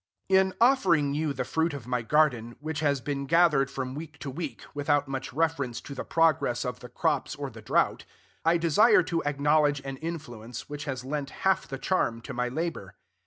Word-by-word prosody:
In 190 0 +4
offering 185 - +4
you 155 0 0
the 130 -2 -3
fruit 160 +1 0
of 135 -5 -8
my 125 -1 -1
garden, 120 -3 +2
which 155 0 -4
has 140 -3 +1
been 140 +1 -3
gathered 165 -4 +4
from 130 -2 -4
week 155 +1 -8
to 140 - -4
week, 145 -4 -6
without 145 -1 +1
much 135 -1 -4
reference 140 -5 -1
to 140 - -8
the 135 - -5
progress 155 -7 +2
of 125 -1 -4
the 125 - -10
crops 125 - -1
or - - -5
the - - -11
drought, - - +1 0.4
I 165 +1 +4
desire 180 +6 +5
to 165 0 -1
acknowledge 145 0 +2
an 135 -1 -6
influence 130 -8 -7
which 145 0 -6
has 130 -3 -4
lent 140 0 -3 0.2
half 190 0 +3
the 135 - -5
charm 125 -8 0
to - - -7
my 125 0 -1
labor. 135 - -4
145 Hz, 195 wpm, -28 LUFS, 130-160 Hz, 0.4 s, desire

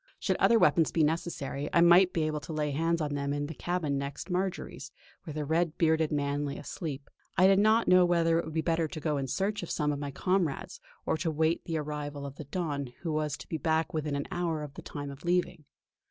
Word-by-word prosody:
Should - - 0
other 235 - +5
weapons 160 -4 +4
be 165 - +2
necessary 150 -3 -2
I 170 - +4
might 175 +2 +7
be 165 - 0
able 155 -1 -1
to 160 - -7
lay 150 -1 -1
hands 165 +3 0
on 145 -1 -1
them 140 0 -1
in 145 0 -2
the 155 - -6
cabin 160 -4 -1
next 140 +6 -5
Marjory's, 185 +1 -3 0.3
where 155 - -6
the 150 -1 -2
red 160 +1 0
bearded 160 -1 +2
man 145 0 0
lay 140 -1 -3
asleep. 145 -4 -6 0.3
I 185 - +6
did 195 0 +6
not 220 +2 +4
know 185 0 +7
whether 170 -1 +3
it - - -3
would 160 - -7
be 160 - +2
better 165 0 +1
to 155 - -7
go 150 -1 -1
in 135 -1 -2
search 200 +9 -1
of 175 - -6
some 150 -2 0
of 145 - -3
my 145 -1 -4
comrades, 175 +1 -1 0.2
or - - +1
to 165 +1 -1
wait 160 +2 0
the 165 -2 -2
arrival 145 -1 -4
of 140 0 -8
the 155 - -7
Don, 145 -3 -3
who 165 -3 -2
was 150 -2 -1
to - - -11
be 160 - -3
back 160 +2 0
within 150 -2 -1
an 140 - -2
hour 170 -4 -1
of 145 -2 -8
the - - -9
time 145 -1 -6
of 140 0 -12
leaving. 175 -2 0
155 Hz, 240 wpm, -30 LUFS, 145-170 Hz, 0.3 s, might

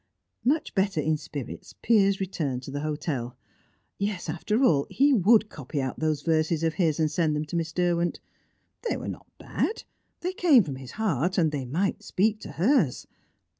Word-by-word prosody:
Much 290 +7 +1
better 195 -3 +1
in 155 +1 +1
spirits, 145 -3 -7
Piers 200 -4 +4
returned 150 -9 -2
to 135 - -7
the 145 - -3
hotel. 145 -5 -3 0.6
Yes, 200 -4 -2
after 210 - 0
all, 145 - +3
he 280 +1 +3
would 220 0 +5
copy 145 -5 -5
out 130 -2 -3
those 155 -2 0
verses 160 0 +1
of 165 -1 +1
his, 165 -5 +1
and 155 -1 +2
send 155 -1 +1
them 150 +1 -2
to 150 - -6
Miss 165 -1 -1
Derwent. 175 0 0 0.7
They - - 0
were - - -6
not - - -7
bad; 440 - -2 0.4
they 360 +2 -2
came 310 - +5
from 140 -5 -5
his 130 -1 -10
heart, 185 - 0
and 160 -4 +3
they 140 -3 -3
might 170 +10 -1
speak 215 +3 +1
to - - -9
hers. 190 - +2
165 Hz, 180 wpm, -27 LUFS, 150-200 Hz, 0.7 s, would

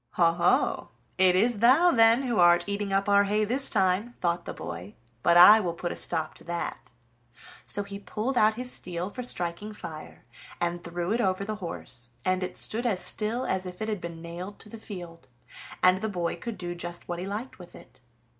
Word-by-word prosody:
"Ho, 170 -2 +4
ho! 170 +1 +1 0.3
it 185 -1 +5
is 220 +3 +2
thou, 275 - +5
then, 230 +1 +5
who 240 -6 -1
art 175 0 +5
eating 200 0 -3
up 195 +1 +1
our 200 0 +4
hay 210 +2 +1
this 260 +5 +3
time," 195 +3 +1
thought 170 -1 -1
the - - -5
boy; 90 +4 -8 0.3
"but 170 +5 +4
I 210 +5 +10
will 175 -5 -3
put 175 0 -4
a - - -5
stop 160 -2 0
to - - -14
that." 170 0 -5 0.8
So 205 - -1
he 200 0 -8
pulled 215 +6 -3
out 215 -2 +4
his 250 +1 -5
steel 180 +2 -3
for 250 - -6
striking 195 -2 -2
fire, 155 - -10 0.3
and 175 0 -2
threw 175 +2 -4
it 240 - +1
over 190 -2 0
the 215 0 -4
horse, 120 -8 -5 0.2
and 185 0 +1
it 185 0 -5
stood 235 +3 0
as 200 -6 0
still 225 +6 0
as 190 0 -2
if 180 0 -9
it 220 - -3
had 210 -4 -3
been 170 -1 -8
nailed 175 +4 -7
to 210 - -11
the 225 - -10
field, 175 -9 -10 0.6
and 185 +1 +5
the 220 - -2
boy 175 -4 -2
could 235 -2 -7
do 175 -1 -5
just 175 0 -6
what 175 -1 -4
he 185 - -5
liked 215 +5 -6
with 175 -1 -13
it. 130 0 -16
185 Hz, 210 wpm, -27 LUFS, 175-215 Hz, 0.8 s, I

